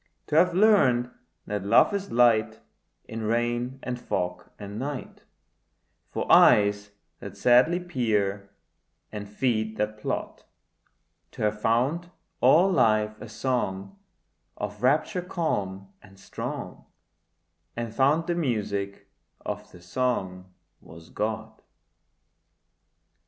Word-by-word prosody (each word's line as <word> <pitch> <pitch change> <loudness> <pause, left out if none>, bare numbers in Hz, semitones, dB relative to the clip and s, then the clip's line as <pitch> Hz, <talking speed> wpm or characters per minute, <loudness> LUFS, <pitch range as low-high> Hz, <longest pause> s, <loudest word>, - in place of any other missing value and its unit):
To 150 - -3
have 175 +2 +4
learnt 135 - +4 0.3
that 105 -2 -3
love 110 - +4
is 200 0 -3
light 115 -2 +3 0.5
In 115 0 -6
rain 120 +3 -1
and 125 -1 -4
fog 90 -1 -3
and 100 +1 -7
night, 140 0 -6 0.8
For - - -3
eyes 100 0 +5 0.3
that 100 0 -9
sadly 125 - +4
peer 105 - -1 0.6
and 105 -1 -7
feet 110 -1 -1
that 105 0 -2
plod: - - -4 0.9
To - - -5
have 105 0 -1
found 135 +11 +1 0.3
all 185 +5 +5
life 110 - +2
a 110 - -8
song 110 - -3 0.6
Of 105 0 -6
rapture 155 +8 +1
calm 100 - -3
and 95 -1 -18
strong, - - -7 0.9
And 115 -1 -4
found 145 +6 +2
the 175 - 0
music 105 - -2 0.3
of - - -6
the 85 - -15
song 95 -4 -2 0.3
was 85 0 -14
God. 110 +1 -4
110 Hz, 110 wpm, -26 LUFS, 100-130 Hz, 0.9 s, eyes